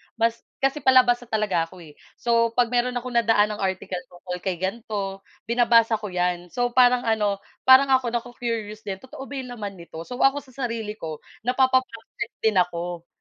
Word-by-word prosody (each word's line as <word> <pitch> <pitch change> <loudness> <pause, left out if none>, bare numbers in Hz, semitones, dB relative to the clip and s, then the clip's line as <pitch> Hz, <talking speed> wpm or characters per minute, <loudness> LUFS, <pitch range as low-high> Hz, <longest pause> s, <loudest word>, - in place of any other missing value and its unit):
mas, 230 0 +1 0.2
kasi 270 +2 +2
palabasa 250 -2 +4
talaga 210 -7 +1
ako 185 - -15
eh, 155 - -13 0.3
so 230 -1 +2
'pag 245 -1 +4
meron 245 +1 +1
akong 250 0 -7
nadaanang 215 -2 +3
article 190 -1 -2
tungkol 180 0 -6
kay 180 -3 -2
ganito 195 -1 -4 0.2
binabasa 230 -1 +4
ko 210 -2 -6
'yan, 180 -1 -1
so 245 0 0
parang 250 -1 +4
ano, 210 -3 +1 0.2
parang 260 +1 +7
ako 255 -2 +3
nacu-curious 230 -3 -4
din 190 -1 -5
totoo 260 +1 -10
ba 280 +1 -8
yung 250 -1 -7
laman 200 -4 -6
nito, 165 -1 -9
so 250 +8 -8
ako 270 +1 +4
sa 260 - -19 0.2
sarili 220 -2 -5
ko 155 -2 -6 0.3
napapa-praktis 250 -3 0
din 215 -4 +4
ako, 175 -1 -2
225 Hz, 175 wpm, -24 LUFS, 190-245 Hz, 0.3 s, parang